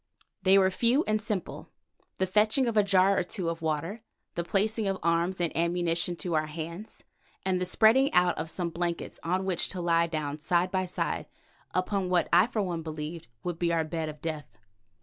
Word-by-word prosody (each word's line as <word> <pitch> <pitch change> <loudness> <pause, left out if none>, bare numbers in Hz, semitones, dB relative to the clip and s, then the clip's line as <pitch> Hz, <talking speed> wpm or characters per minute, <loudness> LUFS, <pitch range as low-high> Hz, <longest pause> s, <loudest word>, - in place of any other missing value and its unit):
They 190 +1 +5
were 190 -1 +4
few 240 - +3
and 215 0 0
simple: 210 -4 -4 0.5
the 190 - +1
fetching 215 +7 +3
of 230 -2 -1
a 210 - +6
jar 195 -1 +3
or - - +1
two 180 -1 -3
of 165 0 -7
water, 165 +7 -2 0.3
the 170 - -2
placing 210 +4 0
of 195 -1 0
arms 170 +2 +1
and 170 -2 -1
ammunition 170 0 +1
to 175 0 -4
our 155 -1 +1
hands, 170 +6 -7 0.4
and 185 -1 +1
the 180 - -1
spreading 235 +8 +4
out 180 -1 +3
of 160 +1 -4
some 170 0 -3
blankets 170 0 -3
on 185 +3 -1
which 185 -3 0
to 185 - -5
lie 170 -1 +2
down 155 -2 -3
side 175 +3 +1
by 185 -1 0
side 180 - -3 0.5
upon 185 0 0
what 180 -2 +2
I 180 +5 +6
for 220 -4 -1
one 175 -3 -3
believed 155 0 -6 0.2
would 175 -2 -4
be 170 -1 +1
our 165 -1 +2
bed 160 0 -3
of 150 -1 -10
death. 155 -4 -5
175 Hz, 200 wpm, -28 LUFS, 165-195 Hz, 0.5 s, a